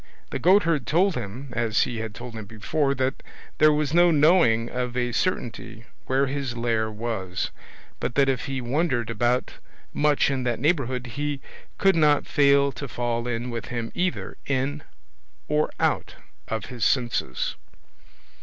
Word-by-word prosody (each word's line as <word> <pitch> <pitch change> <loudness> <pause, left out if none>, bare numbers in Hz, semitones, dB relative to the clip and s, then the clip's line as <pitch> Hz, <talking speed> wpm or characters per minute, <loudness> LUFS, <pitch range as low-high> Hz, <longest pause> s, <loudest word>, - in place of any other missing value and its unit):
The - - -2
goatherd 170 - +3
told 185 +5 +3
him, 125 +2 -6
as 115 -4 +2
he 120 - -3
had 110 -2 -5
told 120 +1 -8
him 110 -2 -7
before, 135 +7 -1
that 130 +1 -1 0.4
there 155 0 +7
was 150 -1 0
no 175 +1 +6
knowing 150 -8 +4
of 125 0 -3
a 120 -1 0
certainty 120 - -3 0.2
where 135 +1 +2
his 135 -3 -3
lair 115 -2 0
was; 105 -4 -3 0.5
but - - -3
that 140 -1 +4
if 135 -2 0
he 135 -2 -3
wandered 125 -2 0
about 120 +3 0 0.3
much 145 -2 +3
in 135 -1 -1
that 120 -2 -1
neighbourhood 130 -4 0
he 145 +3 -3 0.4
could 195 -2 +4
not 150 -3 +4
fail 140 -1 +4
to 135 +3 -6
fall 120 -1 -2
in 120 +1 -2
with 115 -2 -4
him 115 -1 -4
either 180 0 -2
in 140 +2 -1 0.7
or 150 0 +1
out - - 0 0.3
of 110 -2 -3
his 125 -3 -5
senses. 120 - 0
125 Hz, 155 wpm, -25 LUFS, 115-145 Hz, 0.7 s, there